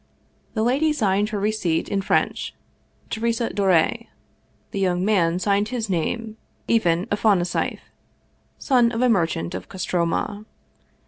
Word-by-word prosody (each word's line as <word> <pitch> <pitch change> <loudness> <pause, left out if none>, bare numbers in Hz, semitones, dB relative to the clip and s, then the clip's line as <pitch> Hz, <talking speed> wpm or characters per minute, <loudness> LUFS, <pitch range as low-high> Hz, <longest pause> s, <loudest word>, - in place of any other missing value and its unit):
The 220 - +1
lady 275 +7 +2
signed 205 -5 +1
her 210 -2 -3
receipt 195 -6 0
in 200 -1 -1
French, 195 - 0 0.6
Teresa 230 +1 -1
Dore; 190 -5 +3 0.8
the 200 - -3
young 180 -1 +1
man 180 -5 +2
signed 200 +2 +1
his 225 -4 -3
name, 220 +6 -2 0.3
Ivan 180 -6 +2
Afonasieff, 200 -4 +1 0.8
son 245 -4 +3
of 230 +2 0
a 250 - +4
merchant 165 - 0
of 95 0 -7
Kostroma. 185 +3 -2
205 Hz, 125 wpm, -23 LUFS, 180-225 Hz, 0.8 s, a